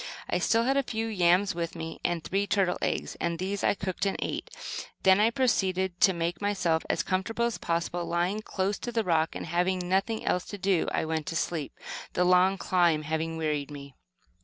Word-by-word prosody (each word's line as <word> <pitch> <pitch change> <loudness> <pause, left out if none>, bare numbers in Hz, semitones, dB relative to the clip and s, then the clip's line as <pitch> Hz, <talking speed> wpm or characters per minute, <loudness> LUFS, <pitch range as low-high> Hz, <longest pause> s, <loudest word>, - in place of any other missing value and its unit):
I - - 0
still 230 0 +3
had 270 +3 +2
a - - +4
few 225 -4 -3
yams 190 -2 +3
with 170 0 -3
me, 165 -1 -6
and 170 -2 -1
three 200 +4 0
turtles' 195 -3 +1
eggs, - - -1
and 170 -1 0
these 195 +3 -3
I - - +3
cooked 190 0 -2
and 195 - -1
ate. - - -3
I - - -16 0.4
then 205 +4 +5
proceeded 190 -8 +1
to 190 - +7
make 170 0 -2
myself 180 -6 +1
as 165 - +1
comfortable 210 +7 0
as 235 - -2
possible 170 +1 -1
by - - -7
lying 185 +5 0
close 195 -1 -2
to 240 - -4
the 225 -1 +1
rock, 165 -4 +1
and, - - -4
having 180 +3 +1
nothing 195 +4 0
else 180 - +1
to 205 - -7
do, 190 -3 +1
I - - 0
went 160 -1 -2
to 165 - -3
sleep, 165 -3 -2 0.4
the 180 - +2
long 180 +2 +4
climb 170 -5 +2
having 160 +1 -2
wearied 150 -3 -1
me. 140 -2 -9
180 Hz, 210 wpm, -28 LUFS, 165-200 Hz, 0.4 s, to